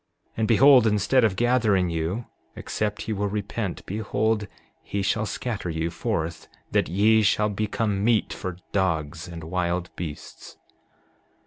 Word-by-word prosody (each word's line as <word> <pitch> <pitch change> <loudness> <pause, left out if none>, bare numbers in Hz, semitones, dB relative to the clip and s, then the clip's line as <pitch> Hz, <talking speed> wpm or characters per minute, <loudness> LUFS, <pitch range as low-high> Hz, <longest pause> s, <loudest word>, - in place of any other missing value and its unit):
7:19 - - -42
And 110 -1 +1
behold, 125 +1 +7
instead 105 +5 +3
of 105 -4 +2
gathering 110 -6 +2
you, 85 +8 -2 0.3
except 105 0 -3
ye 110 - 0
will 100 0 -1
repent, 100 -1 -4
behold, 105 +1 -1 0.3
he 100 -1 -3
shall 110 +2 0
scatter 105 -7 -4
you 80 +1 -2
forth 80 0 -3 0.2
that - - +1
ye 110 +4 +4
shall 105 +1 +2
become 105 0 -1
meat 115 -1 +2
for 90 -2 -5
dogs 85 -3 -1
and 85 -2 -8
wild 90 +1 -2
beasts. 80 -4 -8
100 Hz, 140 wpm, -25 LUFS, 90-110 Hz, 0.3 s, behold